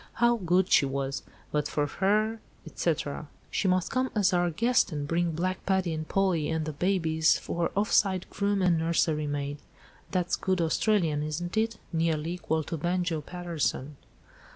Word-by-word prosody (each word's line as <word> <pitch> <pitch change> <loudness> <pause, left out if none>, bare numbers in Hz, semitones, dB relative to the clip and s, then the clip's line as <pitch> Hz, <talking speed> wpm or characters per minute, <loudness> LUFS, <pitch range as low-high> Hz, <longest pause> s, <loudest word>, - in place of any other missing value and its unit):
How 235 0 +3
good 185 -1 +1
she 140 - +5
was. 135 0 -2 0.3
But 150 -1 0
for 150 - 0
her 215 +8 +1
—, - - -31
etc." - - -2 0.2
"She 195 - 0
must 185 -1 +1
come 260 0 +1
as 200 -3 +3
our 175 0 +2
guest, 230 +7 +2
and 145 -2 -3
bring 170 +1 0
Black 185 +3 -2
Paddy 190 -3 +1
and 155 0 -4
Polly, 185 -6 +1
and 160 -1 -1
the 155 - -4
babies, 160 -1 +2
for 170 -1 -2
offside 195 -2 +2
groom 200 -1 0
and 175 -3 +3
nurserymaid—(that's 150 +2 -2
good 185 -1 0
Australian, 165 -2 +1
isn't 160 +5 -3
it? 225 +1 0 0.2
nearly 165 -1 0
equal 160 -3 -1
to 165 - -4
'Banjo' 175 -1 0
Paterson)." 155 -4 -3
175 Hz, 155 wpm, -28 LUFS, 155-190 Hz, 0.3 s, she